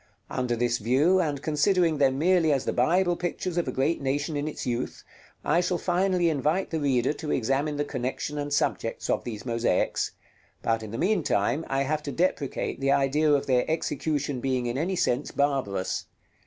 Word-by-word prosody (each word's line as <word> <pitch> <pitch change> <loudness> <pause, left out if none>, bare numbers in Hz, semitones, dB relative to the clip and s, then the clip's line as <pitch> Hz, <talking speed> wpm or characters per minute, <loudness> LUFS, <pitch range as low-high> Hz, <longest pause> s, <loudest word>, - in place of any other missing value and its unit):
Under 125 -2 -1
this 120 0 0
view, 140 - +3
and 145 -5 -1
considering 160 +1 +2
them 135 -2 +3
merely 170 0 +3
as 135 -2 +1
the - - 0
Bible 175 +8 +2
pictures 175 0 -3
of 175 -4 0
a - - -1
great 135 +6 0
nation 145 +3 -1
in 145 +1 -2
its 155 - -5
youth, 120 0 -3 0.4
I 175 - +3
shall 180 0 0
finally 180 0 +1
invite 155 +4 0
the 160 - -1
reader 135 -2 +1
to 155 0 -6
examine 140 +5 0
the 145 - 0
connexion 145 +3 -3
and 145 0 -3
subjects 145 - -1
of - - 0
these 115 -1 -6
mosaics; 115 -1 0 0.5
but 115 -1 +1
in 110 - -7
the 115 - -5
meantime 160 - +1
I 135 0 +1
have 150 +2 -1
to 145 - -5
deprecate 165 -5 -1
the 135 0 +1
idea 140 +2 +3
of 140 -1 +2
their 125 -2 +3
execution 145 -3 -1
being 130 -1 -1
in 120 0 -2
any 170 +7 -1
sense 130 -4 0
barbarous. 135 -10 -1
145 Hz, 185 wpm, -27 LUFS, 130-165 Hz, 0.5 s, view